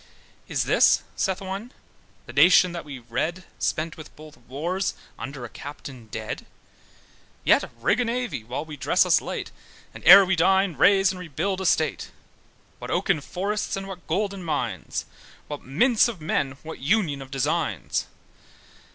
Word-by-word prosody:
`Is - - 0
this', - - +4
saith 190 -1 -1
one, 195 +5 -6 0.6
`the 120 - -9
nation 175 +5 +6
that 170 -1 -6
we 140 -3 -8
read 130 +10 -3 0.2
Spent 160 +1 -2
with 155 - -12
both 155 0 -13
wars, 170 +10 -3 0.2
under 130 -1 -6
a - - -6
captain 135 -4 -10
dead, 110 0 -6 1.0
Yet - - +3
rig 200 - +2
a 245 - +2
navy 240 - -2
while 125 +7 -5
we 155 -2 -9
dress - - +3
us - - +4
late, - - -5 0.4
And - - -11
ere 195 0 +10
we 190 +1 +1
dine, 190 +1 +3
raze 195 +3 +5
and 185 - -8
rebuild 180 +3 -3
their 190 - -1
state? 155 -4 +1 0.7
What - - -7
oaken 150 - +1
forests, 200 +7 -2
and 195 0 -5
what 185 -3 -9
golden 195 +2 -1
mines! 155 -3 -3 0.4
What 145 -1 -7
mints 225 - +3
of 230 -7 -6
men, 140 -3 -1
what 160 +1 -8
union 150 -2 +1
of 135 - -9
designs! 135 - -1
165 Hz, 160 wpm, -25 LUFS, 140-195 Hz, 1.0 s, ere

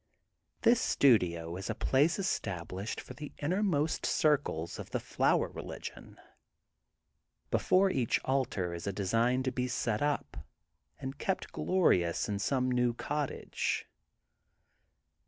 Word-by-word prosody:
This 235 0 +5
studio 85 -10 +3
is 95 +3 -5
a 115 - -1
place 145 +8 +2
estab 100 - -2
lished 95 +4 -4
for - - -9
the 150 -1 -8
innermost 165 -2 0
circles 140 - +1
of - - -7
the - - -1
flower - - +1
religion. - - -8 1.3
Before 190 +1 +3
each 120 -9 +1
altar 120 -10 0
is 85 +2 -6
a - - +1
design 115 +6 +1
to 130 - 0
be 125 0 -1
set 115 -3 -1
up 145 0 -1 0.6
and 135 +2 -6
kept 190 - -2
glorious 90 - +2
in 100 -1 -2
some 130 +4 +1
new 125 -1 +2
cottage. 145 +2 -2
125 Hz, 125 wpm, -31 LUFS, 100-150 Hz, 1.3 s, This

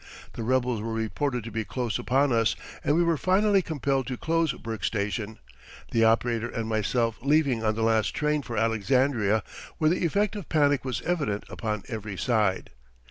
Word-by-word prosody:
The - - -6
rebels 125 -1 +1
were 115 +1 -3
reported 120 +3 -2
to 115 - -7
be 110 +1 -2
close 120 0 -3
upon 135 +2 +2
us 115 -1 +2 0.3
and 145 - +2
we 175 - +4
were 170 -2 +2
finally 195 +4 +3
compelled 140 -5 -1
to 130 -2 -3
close 165 0 +1
Burke 115 -5 -6
Station, 105 +1 -2 0.5
the 115 - +3
operator 115 +1 +2
and 115 -3 -4
myself 115 +1 0
leaving 140 -4 +2
on 110 -1 +1
the 110 - -1
last 110 -1 +2
train 150 0 +1
for 120 -4 -6
Alexandria 115 0 +2 0.3
where 155 -1 +3
the 180 - 0
effect 200 +5 +1
of 200 -7 -7
panic 145 -3 +3
was 130 -4 -3
evident 150 -12 -1
upon 105 -3 -3
every 105 -5 -5
side. 105 -6 0
120 Hz, 180 wpm, -27 LUFS, 110-145 Hz, 0.5 s, we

